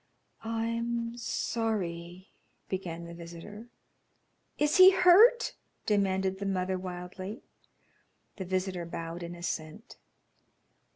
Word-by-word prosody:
"I'm 230 +1 -2
sorry 185 -7 -3 0.2
" - - -42
began 175 -3 -4
the 170 - -9
visitor. 170 +6 -10 0.9
"Is 295 0 +2
he 370 0 +11
hurt?" 390 +7 +6 0.3
demanded 190 -2 +1
the 200 - -3
mother, 185 -1 -1
wildly. 185 +3 -7 0.9
The 190 - -4
visitor 185 -1 -2
bowed 165 +1 -6
in 170 0 -6
assent. 170 +3 -6
190 Hz, 100 wpm, -30 LUFS, 175-230 Hz, 0.9 s, he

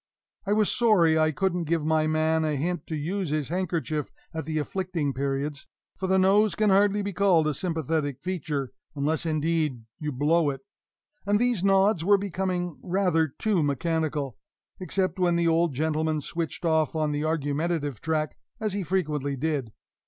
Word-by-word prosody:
I 205 - +3
was 215 -1 +2
sorry 175 -9 +4
I 155 0 +3
couldn't 175 +2 -1
give 160 -1 0
my 155 0 +2
man 160 +1 +2
a 155 -1 0
hint 165 +3 -2
to 160 - -3
use 175 +4 -2
his 150 -2 -1
handkerchief 165 -4 -2 0.2
at 160 0 -4
the 155 -1 -2
affecting 165 -2 -2
periods, 140 +2 -3 0.3
for 190 - -3
the 190 0 +3
nose 200 +3 +4
can 215 -2 +2
hardly 205 +1 +3
be 200 0 -3
called 180 -4 +3
a 155 - +1
sympathetic 160 -4 -1
feature 150 -6 -3 0.2
(unless, 155 +4 0
indeed, 155 -5 0 0.2
you 150 -1 -3
blow 150 +4 +2
it), 135 - -5 0.7
and 205 0 +4
these 240 -6 +1
nods 195 -2 +3
were 200 +3 +5
becoming 185 -3 -2
rather 180 -3 +1
too 190 +6 0
mechanical, 150 -2 -1 0.4
except 185 0 -1
when 175 -1 +3
the 170 0 +2
old 165 -3 +2
gentleman 155 +1 0
switched 165 +3 -4
off 160 -1 +2
on 155 -1 0
the 145 0 -1
argumentative 150 -3 -1
track, 155 -2 -1 0.2
as 215 -3 -1
he 200 - -1
frequently 150 -6 -1
did. 140 -4 -2
160 Hz, 165 wpm, -26 LUFS, 150-185 Hz, 0.7 s, were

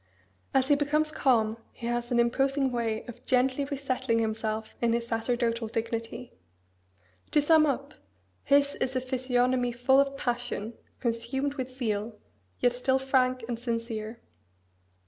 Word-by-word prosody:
As 265 +1 +2
he - - +7
becomes 300 +2 +1
calm 230 -7 +2
he 235 - -9
has 240 0 -1
an 240 - +2
imposing 270 +3 +2
way 230 -2 -2
of 240 - -11
gently 260 +2 +2
resettling 265 -4 -1
himself 220 -1 -2
in 235 -1 +2
his 235 0 0
sacerdotal 235 0 -1
dignity. 230 +2 -4 1.0
To - - +3
sum 310 +1 +5
up: 275 - -2 0.5
his 280 0 +3
is 260 0 -2
a - - +3
physiognomy 250 -1 +1
full 245 +3 +4
of 275 0 +1
passion, 240 -3 -2 0.3
consumed 250 +4 -1
with 260 -3 -4
zeal, 220 -4 -3 0.4
yet 245 - +3
still 260 +2 +1
frank 255 -2 +1
and 235 -2 -3
sincere. 230 -1 -4
245 Hz, 140 wpm, -28 LUFS, 230-265 Hz, 1.0 s, he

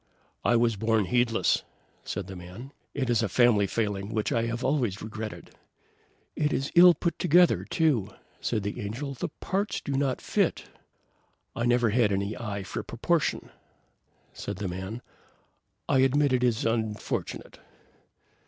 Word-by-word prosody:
"I 120 - +3
was 115 -2 +2
born 110 0 +2
heedless," 120 +3 +2 0.4
said 100 - -4
the 95 0 -8
man. 90 +10 -10 0.2
"It 135 -3 -1
is 120 -2 +2
a 110 - 0
family 110 -2 +4
failing 105 -2 -2
which 110 - 0
I 115 0 +1
have 120 +2 -3
always 125 -8 0
regretted." 110 0 -7 0.8
"It 150 -1 0
is 135 - -1
ill 175 0 +8
put 170 - -2
together, 175 +1 +4
too;" 145 - +1 0.3
said 105 - -1
the 100 - -4
Angel. 120 +8 -4
"The 125 - -3
parts 200 +2 -1
do - - -6
not 135 -1 0
fit." - - 0 0.9
"I 120 +1 0
never 120 -2 +3
had 110 -2 +3
any 100 +2 -1
eye 100 -4 -4
for 95 - -4
proportion," - - -1 0.8
said 100 - -5
the 100 +1 -4
man; 95 +6 -5 0.8
"I 135 - +3
admit 135 +1 +3
it 125 -1 +2
is 120 -3 +1
unfortunate." 110 -2 -3
115 Hz, 150 wpm, -27 LUFS, 105-135 Hz, 0.9 s, ill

